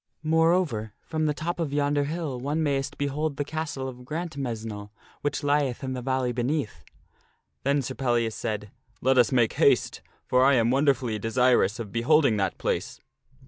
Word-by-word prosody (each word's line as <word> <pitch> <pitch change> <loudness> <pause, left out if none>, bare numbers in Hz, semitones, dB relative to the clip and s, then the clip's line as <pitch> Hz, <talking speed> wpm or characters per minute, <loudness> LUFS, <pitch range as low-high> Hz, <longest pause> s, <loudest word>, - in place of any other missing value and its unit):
More 160 +1 +4
over, 115 - -1
from 155 -1 -1
the 150 - +1
top 170 +3 -3
of 160 -4 -1
yonder 145 0 +1
hill 155 -4 -3
one 145 +5 -1
mayst 140 -1 -1
behold 145 +1 -2
the 145 - -1
castle 145 -3 -4
of 125 -1 -9
Grant 160 +4 -5
mesnle 110 -6 -5 0.3
which 145 0 -2
lieth 145 -3 +1
in 130 0 -3
the 125 - -4
valley 130 -1 0
beneath." 125 0 -2 0.8
Then 140 +1 +1
Sir - - -4
Pellias 120 -3 0
said, 105 -3 -4
" - - -37
Let 130 0 +4
us 120 -4 +4
make 120 -4 +3
haste! - - +2 0.2
For 125 0 +3
I 140 +1 +5
am 115 -1 +3
wonderfully 130 -5 +1
desirous 115 -2 +2
of 110 -4 -6
beholding 125 0 +3
that 95 -2 -1
place." - - -2
135 Hz, 180 wpm, -26 LUFS, 120-150 Hz, 0.8 s, I